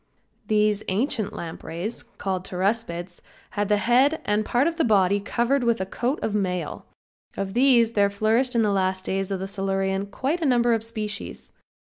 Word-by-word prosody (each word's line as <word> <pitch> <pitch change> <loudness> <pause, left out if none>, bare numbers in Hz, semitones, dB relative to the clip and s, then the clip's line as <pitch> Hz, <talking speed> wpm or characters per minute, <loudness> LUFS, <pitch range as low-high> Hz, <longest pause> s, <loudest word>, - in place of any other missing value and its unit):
These 210 -1 +2
ancient 215 +1 0
lampreys, 170 +5 -5
called 195 -6 -4
Pteraspids, 185 -2 -2 0.3
had 205 0 -1
the 210 - +4
head 255 +9 +3
and 210 +1 +1
part 245 +5 +1
of 335 0 -1
the 325 - +2
body 200 -3 +3
covered 240 +6 0
with 235 -1 +2
a 190 - -1
coat 245 +9 -2
of 215 - -1
mail. 180 -6 -2 0.5
Of 195 -1 -3
these 240 -2 +5
there 205 -3 +3
flourished 225 +5 +1
in 230 - +4
the 210 - +2
last 190 -1 0
days 195 0 -1
of 195 -1 -2
the 190 - -3
Silurian 195 0 -1
quite 275 - -2
a - - 0
number 240 -2 +3
of 225 -1 0
species. 215 -2 -5
210 Hz, 175 wpm, -24 LUFS, 195-235 Hz, 0.5 s, these